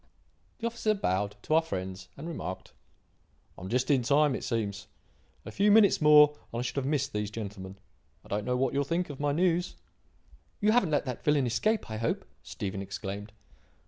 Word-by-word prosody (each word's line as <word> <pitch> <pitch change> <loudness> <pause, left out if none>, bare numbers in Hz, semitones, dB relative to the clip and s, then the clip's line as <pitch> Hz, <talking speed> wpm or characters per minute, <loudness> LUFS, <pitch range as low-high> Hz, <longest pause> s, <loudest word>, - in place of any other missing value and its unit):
The 230 - -5
officer 230 -2 0
bowed 100 - -1
to - - -1
our 160 - +6
friends 95 - -5
and 150 +4 -7
remarked: 95 - -6 0.8
"I - - -13
am 95 - -6
just 125 +4 +1
in 135 -3 +4
time, 145 +3 +3
it - - -4
seems. 105 -4 -3 0.6
A - - -7
few 205 +2 +2
minutes 210 -4 +5
more 150 -1 +7 0.2
and 115 - -5
I 120 - -1
should 125 - -4
have 135 -1 -1
missed 140 -2 0
these 105 -1 -2
gentlemen. 100 -3 -7 0.5
I - - -14
don't 105 +1 -2
know 125 0 0
what 130 -1 0
you'll 140 +1 +1
think 170 +3 -2
of 140 - -10
my 145 0 +1
news." 175 +3 +1 0.8
"You 210 +1 +3
haven't 220 -7 +3
let 150 -1 +1
that 125 -3 -5
villain 150 -3 +3
escape, 120 - 0
I 110 - -3
hope," 115 +1 -2 0.2
Stephen 100 -1 -5
exclaimed. 100 +1 -6
130 Hz, 195 wpm, -29 LUFS, 105-155 Hz, 0.8 s, more